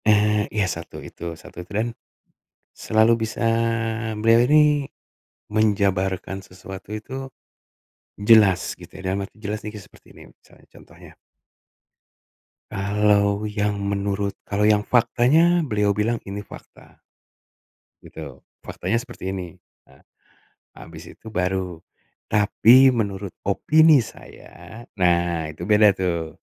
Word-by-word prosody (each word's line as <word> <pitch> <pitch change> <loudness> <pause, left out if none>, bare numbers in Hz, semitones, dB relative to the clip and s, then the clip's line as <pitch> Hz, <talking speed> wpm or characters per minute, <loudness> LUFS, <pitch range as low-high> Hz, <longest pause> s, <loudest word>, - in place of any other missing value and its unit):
Eee, 105 0 +3
ya 105 -2 0
satu 85 -3 -6
itu 85 -1 -8
satu 90 - -11
itu, 90 - -15
dan 110 +2 0 0.9
selalu 110 +1 +2
bisa 110 0 -4 0.8
beliau 115 +2 +4
ini 150 +1 +3 0.6
menjabarkan 95 -3 0
sesuatu 95 +2 -10
itu, 130 +4 -7 1.0
jelas 100 -5 +5
gitu, - - -14
dalam 95 +1 -2
arti 105 - -20
jelas 105 +1 -5
ini 105 - -6
ke 105 - -9
seperti - - -19
ini - - -15
misalnya, - - -24
contohnya. - - -17 1.6
Kalau 100 +1 +1
yang 105 -1 -1
menurut 100 0 -2 0.2
kalau 100 0 -1
yang 105 0 +4
faktanya, 145 +8 +3
beliau 105 -10 0
bilang 110 +3 -1
ini 100 +1 -6
fakta. 105 - -14 1.0
Gitu, - - -10 0.2
faktanya 95 +6 -2
seperti 115 -6 -6
ini. 90 -3 -5 0.3
Nah, 65 0 -22 0.8
habis - - -11
itu - - -19
baru, 90 -4 -3 0.5
"Tapi 120 +5 +5
menurut 100 -4 -3
opini 155 - +4
saya." 115 0 -10
Nah, 85 -4 +1
itu 80 +3 -8
beda 105 0 +5
tuh, 85 -3 -3
105 Hz, 115 wpm, -22 LUFS, 95-110 Hz, 1.6 s, jelas